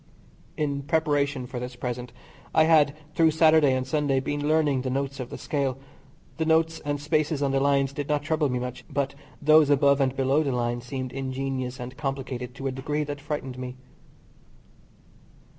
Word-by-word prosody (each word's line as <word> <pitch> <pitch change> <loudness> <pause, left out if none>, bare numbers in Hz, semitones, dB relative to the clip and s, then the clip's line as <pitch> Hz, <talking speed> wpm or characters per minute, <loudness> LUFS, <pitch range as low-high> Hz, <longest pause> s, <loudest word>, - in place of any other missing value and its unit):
In 140 -2 -1
preparation 145 -3 0
for 125 0 -6
this 125 0 -6
present 125 0 -4 0.4
I 160 - +7
had 155 -3 +4 0.2
through 165 0 +4
Saturday 155 -3 +5
and 130 0 -1
Sunday 140 0 +1
been 145 +2 -2
learning 150 -4 +2
the 130 - -3
notes 140 +1 -2
of 125 -1 -5
the - - -7
Scale. 140 -3 -1 0.6
The 160 - 0
notes 160 0 +2
and 145 0 -3
spaces 150 0 0
on 140 - +1
the 135 - +2
lines 140 0 +2
did 145 0 -4
not 145 -1 +1
trouble 155 -1 +1
me 125 - -1
much, 125 0 -5
but 140 -1 -1 0.3
those 155 0 +5
above 140 0 +4
and 135 -1 +1
below 135 +3 +2
the 140 -4 -1
line 120 0 -1
seemed 130 0 -5
ingenious 130 -1 -3
and 125 +1 -7
complicated 135 -3 -4
to 135 - -7
a 135 - 0
degree 145 +3 -2
that 145 -1 -6
frightened 140 -3 -4
me. 125 0 -6
140 Hz, 180 wpm, -26 LUFS, 130-150 Hz, 0.6 s, I